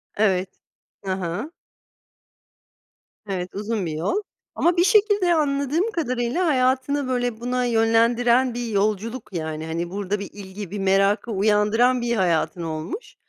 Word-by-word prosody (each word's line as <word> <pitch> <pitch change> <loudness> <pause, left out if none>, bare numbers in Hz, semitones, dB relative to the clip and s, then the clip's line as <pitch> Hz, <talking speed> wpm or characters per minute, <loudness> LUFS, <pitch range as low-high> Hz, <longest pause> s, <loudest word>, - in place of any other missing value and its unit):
Evet, 190 -3 0 0.4
Hı 190 - -2
hı. 190 - -4 1.7
Evet 185 -3 -3
uzun 210 -1 -2
bir 165 - -3
yol. 160 - -1 0.4
Ama 345 +1 +2
bir 345 - +5
şekilde 410 -3 +4
anladığım 300 - +1
kadarıyla 255 - -1
hayatını, 260 0 +1
böyle, 245 -3 -1
buna 250 +1 -1
yönlendiren 235 +2 +3
bir 240 0 -3
yolculuk 215 +2 -1
yani, 160 -2 -4
hani, 170 +2 -3
burada 200 +2 -3
bir 200 - -6
ilgi, 195 -1 -8
bir 205 - -4
merakı 195 +4 +2
uyandıran 215 +5 +3
bir 235 0 0
hayatın 175 -2 0
olmuş. 160 - -6
225 Hz, 130 wpm, -23 LUFS, 195-255 Hz, 1.7 s, bir